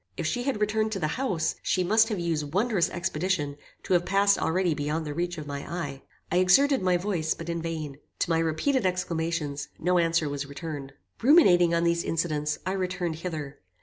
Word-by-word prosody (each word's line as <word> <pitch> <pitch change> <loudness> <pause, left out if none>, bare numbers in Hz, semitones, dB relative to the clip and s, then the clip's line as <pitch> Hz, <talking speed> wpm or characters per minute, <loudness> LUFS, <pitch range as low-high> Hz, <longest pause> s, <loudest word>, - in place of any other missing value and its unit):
If - - -3
she 245 - -1
had 255 -3 -1
returned 215 +1 +1
to 195 - -2
the 155 -3 0
house, 170 -12 0
she 185 - +1
must 220 +5 +4
have 210 - -1
used 160 -3 -2
wondrous 210 -4 +2
expedition 170 -3 -1 0.3
to - - -1
have 175 -1 +4
passed 200 +2 +3
already 175 0 +1
beyond 150 +2 -2
the 150 - -4
reach 175 +2 -2
of 155 - -6
my 140 -1 -4
eye. 145 -6 -4 0.3
I 175 - +2
exerted 270 +9 +4
my 180 -1 +3
voice, 175 -4 -1
but 165 0 -7
in 170 0 -2
vain. 155 -4 -5 0.2
To - - -1
my 165 - +3
repeated 165 - +1
exclamations, 165 -5 -2
no 180 +1 +2
answer 165 -2 +2
was 145 0 -4
returned. 140 -1 -7 0.3
"Ruminating 180 - +6
on 170 - +1
these 170 0 +1
incidents, 150 -2 -1
I 185 - 0
returned 180 -3 -2
hither. 155 -5 -5
170 Hz, 195 wpm, -27 LUFS, 155-185 Hz, 0.3 s, Ruminating